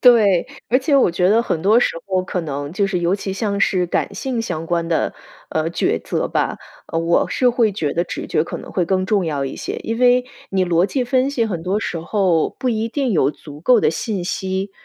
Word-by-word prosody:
对， 220 -6 +5 0.2
而 255 - +4
且 280 +1 +2
我 255 - +4
觉 180 +1 +2
得 225 +4 +4
很 165 -8 -2
多 210 +6 +5
时 245 - +2 0.2
候 185 -1 0
可 185 - -2
能 145 -1 -5
就 200 +1 +1
是 185 -3 -1
尤 175 +2 +2
其 195 -1 -4
像 200 -1 -1
是 180 -2 +2
感 - - -1
性 255 -3 -2
相 175 -8 -3
关 170 0 -1
的， 165 - 0 0.4
呃， 160 +1 -1
抉 170 - 0
择 - - -1
吧， - - -1 0.3
呃， 165 - -2
我 165 +1 +2
是 250 -1 +2
会 230 -3 +2
觉 160 -7 -2
得 170 - +1
直 - - -5
觉 155 - +1
可 - - -5
能 - - -10
会 180 -3 0
更 185 0 +1
重 195 -2 +1
要 145 -3 -1
一 135 - -4
些。 - - -4
因 225 +1 -3
为 250 0 +4 0.2
你 190 -1 +1
逻 175 +1 +2
辑 260 +2 -1
分 255 +2 +2
析 240 -5 0
很 175 -7 -3
多 190 +4 0
时 170 - -3
候 175 -2 +1
不 255 -2 0
一 225 0 -1
定 260 -1 -1
有 140 -5 +3
足 150 -1 -12
够 245 +6 +5
的 - - +3
信 185 +3 -3
息， 190 0 -2
190 Hz, 255 characters per minute, -20 LUFS, 170-230 Hz, 0.4 s, 对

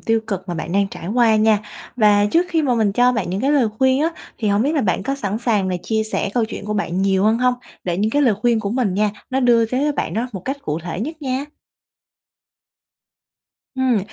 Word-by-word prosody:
tiêu 225 0 +1
cực 190 -1 -4
mà 175 - -2
bạn 165 +1 -5
đang 200 0 +2
trải 170 - -9
qua 225 0 +3
nha. 215 0 +4 0.4
Và 205 -3 +4
trước 335 +12 +2
khi 325 -2 +1
mà 260 -4 +1
mình 215 -4 +1
cho 245 +3 +3
bạn 220 -7 -2
những 190 +2 -2
cái 275 +4 +1
lời 265 -6 +3
khuyên 260 +1 +3
á 320 - +3 0.3
thì 215 -3 -1
hông 200 +2 +2
biết 285 +5 +1
là 295 - +2
bạn 195 -4 0
có 275 +7 -1
sẵn 210 -5 -3
sàng 215 -5 0
là 185 - -1
chia 220 -1 0
sẻ 200 - -1
câu 240 - +2
chuyện 220 - -7
của 210 +1 -3
bạn 190 -2 -1
nhiều 195 0 +2
hơn 220 +2 +3
hông? 250 0 +2 0.3
Để 175 -2 -1
những 215 +2 +1
cái 290 +5 +2
lời 235 -7 +4
khuyên 235 -2 +3
của 200 -1 -3
mình 230 -6 0
nha, 210 +1 +2 0.2
nó 265 +1 0
đưa 240 -2 +4
tới 255 +4 -1
cho 295 - +1
bạn - - -3
đó 230 +3 -1
một 190 - -5
cách 270 +2 -2
cụ 150 +1 -2
thể 175 +1 -5
nhất 310 +6 -5
nha. 260 0 -2 2.3
Ừm, 260 -4 +2
220 Hz, 250 wpm, -20 LUFS, 200-255 Hz, 2.3 s, nha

